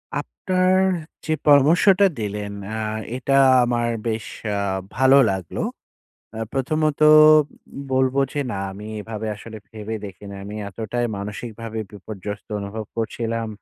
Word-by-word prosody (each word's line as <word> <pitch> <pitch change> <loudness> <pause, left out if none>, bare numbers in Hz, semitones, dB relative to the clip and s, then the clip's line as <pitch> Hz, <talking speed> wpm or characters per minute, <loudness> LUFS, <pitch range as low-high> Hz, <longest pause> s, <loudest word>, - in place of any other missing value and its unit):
আপনার 185 0 +1 0.5
যে 155 - +1
পরামর্শটা 170 +8 +6
দিলেন 105 -1 -4 0.2
আ - - -3 0.4
এটা 135 +1 0 0.3
আমার 120 -1 0 0.2
বেশ 110 -1 -2 0.3
আ - - -1 0.4
ভালো 130 +3 +6
লাগলো। 95 -4 -4 0.7
আ - - -5
প্রথমত 155 +3 0 0.9
বলব, 130 0 +2 0.2
যে 145 - -1
না - - -3 0.2
আমি 105 +2 -9
এভাবে 110 0 -5
আসলে 110 +1 -10
ভেবে 110 0 -6
দেখি 100 +1 -11
নাই। 100 - -8
আমি 105 +1 -7
এতটাই 115 +4 -3
মানসিকভাবে 110 +2 -6
বিপর্যস্ত 105 0 -7
অনুভব 105 +2 -5
করছিলাম। 115 0 -2
115 Hz, 125 wpm, -22 LUFS, 105-135 Hz, 0.9 s, পরামর্শটা